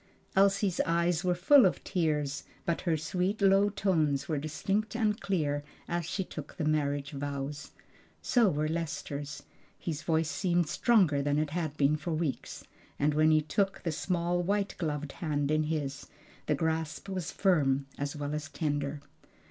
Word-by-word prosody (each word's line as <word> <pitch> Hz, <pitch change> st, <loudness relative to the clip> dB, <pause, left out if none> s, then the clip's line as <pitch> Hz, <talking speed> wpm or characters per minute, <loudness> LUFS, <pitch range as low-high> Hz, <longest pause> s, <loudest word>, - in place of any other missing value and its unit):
Elsie's 195 Hz, -1 st, +3 dB
eyes 170 Hz, 0 st, +1 dB
were 180 Hz, -1 st, +2 dB
full 255 Hz, +10 st, +6 dB
of 185 Hz, -, +2 dB
tears, 150 Hz, -5 st, -1 dB, 0.2 s
but 170 Hz, -, 0 dB
her 170 Hz, -4 st, +1 dB
sweet 180 Hz, +7 st, -1 dB
low 195 Hz, 0 st, +5 dB
tones 160 Hz, -9 st, +1 dB
were 155 Hz, -3 st, 0 dB
distinct 195 Hz, +9 st, -2 dB
and 220 Hz, -1 st, +1 dB
clear 145 Hz, -7 st, 0 dB, 0.2 s
as 170 Hz, -2 st, -2 dB
she 190 Hz, -, -1 dB
took 150 Hz, -5 st, -9 dB
the 160 Hz, -, -1 dB
marriage 145 Hz, -2 st, 0 dB
vows. 145 Hz, +1 st, -4 dB, 0.5 s
So 235 Hz, -5 st, +3 dB
were 150 Hz, -1 st, 0 dB
Lester's; 155 Hz, -3 st, -4 dB, 0.3 s
his 160 Hz, -3 st, -4 dB
voice 160 Hz, -1 st, +1 dB
seemed 175 Hz, -3 st, +1 dB
stronger 180 Hz, -, +3 dB
than 145 Hz, +1 st, +1 dB
it 150 Hz, -1 st, 0 dB
had 160 Hz, -3 st, -3 dB
been 145 Hz, +1 st, +3 dB
for 160 Hz, +2 st, -3 dB
weeks, 155 Hz, -3 st, -3 dB, 0.3 s
and 150 Hz, +1 st, +2 dB
when 155 Hz, +1 st, +4 dB
he 155 Hz, -1 st, +5 dB
took 195 Hz, +5 st, -1 dB
the 165 Hz, -, 0 dB
small 175 Hz, +2 st, 0 dB
white 200 Hz, +2 st, 0 dB
gloved 150 Hz, -4 st, -2 dB
hand 145 Hz, -3 st, -1 dB
in 155 Hz, 0 st, +2 dB
his, 145 Hz, -3 st, -3 dB, 0.4 s
the 150 Hz, -, +2 dB
grasp 160 Hz, +3 st, -2 dB
was 185 Hz, -5 st, -3 dB
firm 140 Hz, -8 st, +2 dB
as 145 Hz, +2 st, -3 dB
well 145 Hz, 0 st, -3 dB
as 150 Hz, -2 st, -4 dB
tender. 145 Hz, -1 st, -2 dB
155 Hz, 165 wpm, -30 LUFS, 145-180 Hz, 0.5 s, full